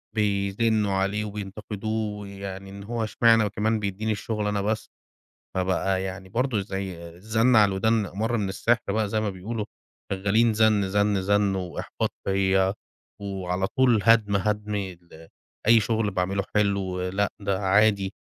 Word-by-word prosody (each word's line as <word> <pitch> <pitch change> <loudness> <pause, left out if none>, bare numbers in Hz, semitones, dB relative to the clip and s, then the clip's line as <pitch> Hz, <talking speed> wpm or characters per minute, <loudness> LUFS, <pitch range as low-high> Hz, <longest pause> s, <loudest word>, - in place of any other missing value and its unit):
بيزنّوا 105 +1 +1
عليه 100 +2 0
وبينتقدوه 105 +1 -4
يعني 100 0 -7
إن 100 0 -9
هو 115 +1 -3
إشمعنى 115 +1 +4
وكمان 110 +2 0
بيدّيني 105 +2 -2
الشُغل 105 0 -2
أنا 105 -1 0
بس. 110 +2 -2 0.7
فبقى 95 +1 0
يعني 95 0 -6
برضه 120 0 0
زي 95 -4 -5
زَن 110 +4 +3
على 105 -2 +6
الودان 105 +2 +1
أمَر 110 +6 -2
من 100 -3 -1
السِحر 115 +4 +1
بقى 110 -1 0
زي 110 +1 0
ما 105 -2 -1
بيقولوا، 105 +4 -4 0.5
شغّالين 105 +4 +2
زَن، 105 -3 +3
زَن، 100 -1 +1
زَن 100 0 +2
وإحباط 90 -2 -3
فيّا 95 0 +2 0.5
وعلى 95 -1 -2
طول 125 -4 +3
هَدْم، 110 -3 +4
هَدْم 105 +1 -1
ال 85 -4 -7 0.4
أي 115 0 +7
شُغل 110 -1 0
باعمله 95 +1 -1
حلو، 100 -3 +1
لأ 100 +2 0
ده 100 -1 -1
عادي، 100 0 +3
100 Hz, 145 wpm, -25 LUFS, 95-110 Hz, 0.7 s, أي